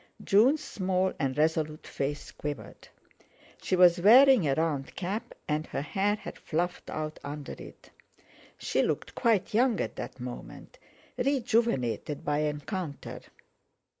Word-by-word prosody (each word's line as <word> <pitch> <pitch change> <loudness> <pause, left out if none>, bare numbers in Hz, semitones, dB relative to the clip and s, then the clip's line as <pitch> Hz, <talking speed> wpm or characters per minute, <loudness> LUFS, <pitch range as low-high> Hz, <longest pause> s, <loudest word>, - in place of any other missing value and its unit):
June's 260 +10 +4
small 185 -5 0
and 135 0 -1
resolute 155 0 0
face 145 +1 -4
quivered. 145 -8 -7 0.7
She - - 0
was 175 -1 +6
wearing 245 - +7
a 135 - +2
round 150 -4 -1
cap, 210 +6 -4
and 155 +1 -1
her 140 - -3
hair 200 +7 0
had - - -9
fluffed 175 +3 -2
out 155 0 -4
under 145 0 -6
it. - - -12 0.7
She - - 0
looked - - -2
quite 225 -7 +1
young 235 0 +3
at - - -3
that - - -7
moment, 125 0 -9 0.4
rejuvenated 230 - 0
by 145 0 +1
encounter. 150 +2 -4
170 Hz, 130 wpm, -29 LUFS, 150-210 Hz, 0.7 s, wearing